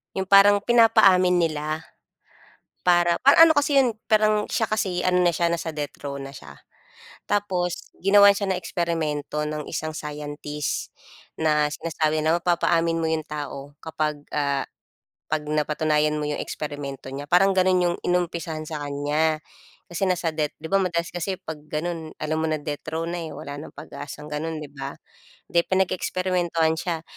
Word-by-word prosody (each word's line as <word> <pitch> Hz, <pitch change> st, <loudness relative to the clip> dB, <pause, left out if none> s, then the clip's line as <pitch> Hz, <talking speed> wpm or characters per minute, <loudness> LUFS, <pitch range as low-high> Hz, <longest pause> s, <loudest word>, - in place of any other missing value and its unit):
yung 190 Hz, -, 0 dB
parang 200 Hz, +1 st, +7 dB
pinapaamin 220 Hz, -6 st, +5 dB
nila 155 Hz, 0 st, -2 dB, 1.0 s
para 175 Hz, -1 st, +4 dB
pa 280 Hz, +2 st, +6 dB
ano 330 Hz, 0 st, +8 dB
kasi 290 Hz, -1 st, +2 dB
'yon, 250 Hz, -5 st, +3 dB
parang 215 Hz, -1 st, +3 dB
siya 225 Hz, -3 st, -1 dB
kasi 190 Hz, -4 st, 0 dB
ano 180 Hz, 0 st, +2 dB
na 170 Hz, -, +3 dB
siya, 170 Hz, +1 st, +1 dB
nasa 165 Hz, -1 st, -3 dB
death 145 Hz, -2 st, -5 dB
row 140 Hz, -, -4 dB
na 135 Hz, -, -7 dB
siya. 75 Hz, -, -12 dB, 0.7 s
Tapos 185 Hz, -4 st, -1 dB
ginawan 200 Hz, +1 st, +6 dB
siya 200 Hz, -2 st, 0 dB
ng 180 Hz, -, -2 dB
eksperimento 155 Hz, -4 st, -2 dB
ng 150 Hz, 0 st, -3 dB
isang 155 Hz, 0 st, -4 dB
scientist 150 Hz, 0 st, -5 dB, 0.4 s
na 150 Hz, -1 st, +2 dB
sinasabi 155 Hz, -1 st, -1 dB
na 160 Hz, +2 st, +2 dB
mapapaamin 170 Hz, -1 st, +1 dB
mo 160 Hz, -, 0 dB
'yong 160 Hz, -1 st, -1 dB
tao 145 Hz, -1 st, -6 dB
kapag, 155 Hz, -2 st, -2 dB, 0.2 s
ah, 140 Hz, -1 st, 0 dB, 0.6 s
'pag 155 Hz, -, +2 dB
napatunayan 150 Hz, 0 st, +1 dB
mo 150 Hz, -, -2 dB
'yong 150 Hz, -, -2 dB
eksperimento 145 Hz, -3 st, -6 dB
niya, 135 Hz, +2 st, -6 dB
parang 190 Hz, +5 st, +3 dB
gano'n 185 Hz, 0 st, +4 dB
'yong 175 Hz, -, -1 dB
inumpisahan 170 Hz, -3 st, -1 dB
sa 150 Hz, -2 st, -4 dB
kanya. 150 Hz, +2 st, 0 dB, 0.5 s
Kasi 175 Hz, +3 st, -2 dB
nasa 180 Hz, -2 st, 0 dB
death 150 Hz, -1 st, -1 dB
'di 160 Hz, -, -6 dB
ba 195 Hz, -, +2 dB
madalas 170 Hz, -3 st, -1 dB
kasi 180 Hz, +2 st, -4 dB
'pag 155 Hz, -5 st, -8 dB
gano'n 160 Hz, +1 st, -4 dB
alam 155 Hz, +1 st, -1 dB
mo 160 Hz, -, 0 dB
na 155 Hz, -1 st, -1 dB
death 145 Hz, 0 st, -5 dB
row 165 Hz, +1 st, -2 dB
na, 175 Hz, +1 st, -3 dB
eh, 160 Hz, -, -7 dB
wala 145 Hz, -1 st, -7 dB
ng 145 Hz, -, -9 dB
pag-asang 150 Hz, +1 st, -9 dB
gano'n, 155 Hz, +1 st, -4 dB
'di 150 Hz, -, -8 dB
ba? 140 Hz, -1 st, -6 dB, 0.6 s
Di 170 Hz, -, +4 dB
pinag-eksperimentuhan 180 Hz, -3 st, +1 dB
siya. 165 Hz, -3 st, -3 dB
160 Hz, 165 wpm, -24 LUFS, 150-180 Hz, 1.0 s, ano